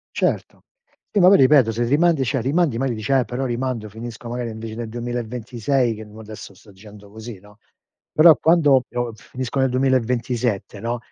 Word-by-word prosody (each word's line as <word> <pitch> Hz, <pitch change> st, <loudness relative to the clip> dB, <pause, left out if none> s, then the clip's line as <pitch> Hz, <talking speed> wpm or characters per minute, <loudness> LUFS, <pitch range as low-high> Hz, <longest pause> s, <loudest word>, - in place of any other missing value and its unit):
Certo. -, -, -2 dB, 0.5 s
Sì, 205 Hz, -, +1 dB
ma 180 Hz, -, +7 dB
poi 200 Hz, -, +7 dB
ripeto, 130 Hz, -3 st, +5 dB
se 120 Hz, +2 st, -1 dB
rimandi, 150 Hz, +2 st, +2 dB
cioè, 130 Hz, +1 st, -1 dB
rimandi 140 Hz, -2 st, +1 dB
magari 130 Hz, -3 st, -1 dB
dici: 110 Hz, +5 st, -3 dB
"Eh, 130 Hz, -2 st, +3 dB
però 125 Hz, +2 st, -4 dB
rimando 120 Hz, -3 st, -3 dB
finisco, 115 Hz, +2 st, -9 dB
magari 120 Hz, -1 st, -4 dB
invece 110 Hz, 0 st, -7 dB
del 115 Hz, -1 st, -5 dB
2026", 120 Hz, +1 st, -2 dB
che 110 Hz, +1 st, -9 dB
mo 105 Hz, +1 st, -13 dB
adesso 105 Hz, -2 st, -10 dB
sto 100 Hz, +3 st, -19 dB
dicendo 105 Hz, +1 st, -15 dB
così, 110 Hz, -1 st, -9 dB
no? 105 Hz, +1 st, -19 dB, 0.5 s
Però, 160 Hz, 0 st, +7 dB
quando 150 Hz, -6 st, +4 dB
io 120 Hz, -1 st, -3 dB
finisco 130 Hz, +4 st, -5 dB
nel 130 Hz, -1 st, +2 dB
2027, 125 Hz, -5 st, -1 dB
no? 120 Hz, +2 st, -3 dB
120 Hz, 180 wpm, -21 LUFS, 110-130 Hz, 0.5 s, ma